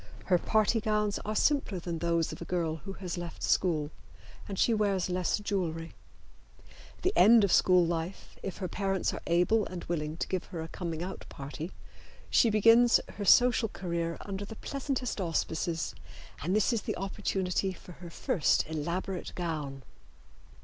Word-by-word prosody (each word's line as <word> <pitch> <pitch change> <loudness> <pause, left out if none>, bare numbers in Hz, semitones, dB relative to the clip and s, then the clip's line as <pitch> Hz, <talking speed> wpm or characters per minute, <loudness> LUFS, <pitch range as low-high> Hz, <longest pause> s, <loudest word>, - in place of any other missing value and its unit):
Her 180 -3 +3
party 220 +3 +2
gowns 210 -1 0
are 215 +1 -2
simpler 275 -7 +2
than 170 -1 -4
those 170 -1 +1
of - - -9
a - - -5
girl 165 -3 -1
who 195 +5 -8
has 180 -3 -5
left 170 -1 -7
school, 155 -5 +1 0.6
and 195 - -5
she 235 - +3
wears 200 -4 +1
less 180 -1 +1
jewelry. 175 -6 -3 1.0
At - - -20
the 375 - +2
end 225 0 +7
of 200 - +2
school 180 -2 +5
life, 170 +2 -4
if 195 - -5
her 190 - -3
parents 195 0 -1
are - - -6
able 180 +6 +3
and 180 -1 -6
willing 155 -2 -3
to - - -2
give 185 -2 -2
her 175 - -7
a 160 - -5
coming 170 -2 -4
out 190 +2 -7
party, 150 +5 -7 0.6
she 235 - +5
begins 230 +3 +6
her 205 - -6
social 245 0 +5
career 170 -3 -3
under 200 0 -5
the 210 +2 -8
pleasantest 265 -3 -3
auspices, 165 0 -1 0.5
and 180 +6 0
this 215 +3 +3
is 225 - 0
the - - -3
opportunity 195 -1 -1
for 180 0 -12
her 175 0 -10
first 160 -1 +1
elaborate 170 +4 -3
gown. 150 -6 -4
185 Hz, 170 wpm, -30 LUFS, 170-210 Hz, 1.0 s, end